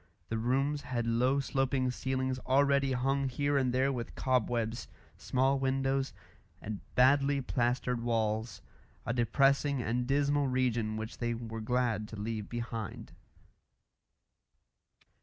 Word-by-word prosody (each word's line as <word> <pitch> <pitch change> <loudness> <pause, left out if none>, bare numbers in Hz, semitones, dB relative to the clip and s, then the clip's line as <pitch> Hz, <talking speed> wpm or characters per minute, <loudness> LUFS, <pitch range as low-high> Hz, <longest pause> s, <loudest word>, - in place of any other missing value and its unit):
The 115 - -1
rooms 135 +5 +1
had 120 -3 -2
low 125 +4 +2
sloping 135 -1 0
ceilings 130 0 -2
already 140 +1 +2
hung 135 +2 0
here 145 +3 0
and 130 -2 +2
there 130 +2 +2
with 120 -3 -5
cobwebs, 120 - 0 0.3
small 135 +1 +1
windows, 135 0 0 0.5
and 105 -1 -6
badly 140 +2 +4
plastered 125 -1 0
walls 110 -1 -1 0.4
a 115 - -1
depressing 135 +4 +2
and 120 +1 -1
dismal 145 +1 +2
region 120 -4 0
which 110 +1 -6
they 120 -1 -1
were 115 -1 -6
glad 115 -2 0
to 110 - -9
leave 105 0 -4
behind. 115 -3 -5
125 Hz, 120 wpm, -31 LUFS, 115-135 Hz, 0.5 s, badly